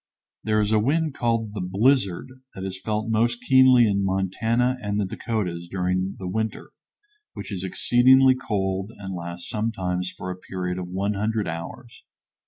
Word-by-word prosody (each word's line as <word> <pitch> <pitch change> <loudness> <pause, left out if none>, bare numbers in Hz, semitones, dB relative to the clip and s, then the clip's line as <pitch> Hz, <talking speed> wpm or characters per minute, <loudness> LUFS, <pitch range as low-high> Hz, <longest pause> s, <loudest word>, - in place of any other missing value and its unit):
There 110 -1 +1
is 105 0 +1
a 110 - +4
wind 155 +6 +1
called 115 -4 -1
the 105 - -4
"blizzard" 100 +2 +1 0.3
that 95 - -6
is 95 0 -6
felt 110 +1 -2
most 115 +2 +1
keenly 130 -2 +6
in 100 -2 +1
Montana 110 +7 0
and 105 0 -2
the 105 - +1
Dakotas 95 -4 -3
during 95 +1 -1
the 95 - -6
winter, 110 +4 -3 0.6
which - - -8
is 95 -2 -4
exceedingly 130 +7 +5
cold 95 -5 -2
and 95 -2 -6
lasts 85 0 -6
sometimes 90 -5 -2
for 90 0 -6
a - - -5
period 90 -1 -4
of 90 - -5
100 100 +3 -1
hours. 85 +9 -7
100 Hz, 160 wpm, -24 LUFS, 95-115 Hz, 0.6 s, keenly